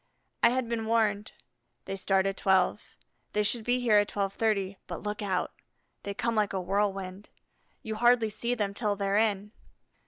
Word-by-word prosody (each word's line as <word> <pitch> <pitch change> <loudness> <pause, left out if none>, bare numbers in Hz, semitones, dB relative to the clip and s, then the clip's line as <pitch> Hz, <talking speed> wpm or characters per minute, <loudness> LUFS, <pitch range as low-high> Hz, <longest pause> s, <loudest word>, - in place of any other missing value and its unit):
I 235 - +7
had 255 0 -1
been 225 -1 -2
warned: 215 -2 +1 0.5
"They 195 - -4
start 195 0 +1
at 195 0 0
12; 190 - +2 0.5
they 210 - +2
should 225 +2 0
be 245 +2 +2
here 220 -4 +5
at 205 - 0
12:30; 200 -1 -1
but - - -6
look 210 0 -3
out, 190 -3 -1 0.5
they 200 0 -5
come 235 +3 -1
like 210 -3 +1
a 190 - -1
whirlwind. 195 0 -2 0.5
You 220 - -4
hardly 235 0 +3
see 235 +3 -1
them 205 -4 -2
till 210 -1 -1
they're 200 0 0
in." 210 -2 +1
210 Hz, 175 wpm, -29 LUFS, 195-225 Hz, 0.5 s, I